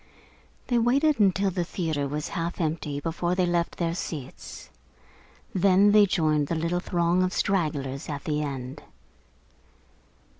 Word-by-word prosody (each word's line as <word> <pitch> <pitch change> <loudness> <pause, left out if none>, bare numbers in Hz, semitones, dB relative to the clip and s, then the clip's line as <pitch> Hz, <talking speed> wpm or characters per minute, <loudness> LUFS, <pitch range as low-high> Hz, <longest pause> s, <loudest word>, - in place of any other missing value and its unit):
They 240 -2 +1
waited 275 +5 +2
until 195 -1 +3
the 175 -1 -1
theatre 160 -5 -2
was 150 +2 -4
half 170 +1 -3
empty 155 -3 -2
before 170 +3 -2
they 185 -1 +2
left 175 -1 -1
their 165 -1 -1
seats. 155 -6 -7 0.8
Then 195 +2 +4
they 210 -1 +6
joined 155 -5 +1
the 165 - -1
little 170 +2 -1
throng 175 0 +1
of 185 0 +1
stragglers 145 -8 -1
at 145 -1 -5
the 150 -1 -1
end. 135 -3 -5
170 Hz, 140 wpm, -26 LUFS, 150-185 Hz, 0.8 s, they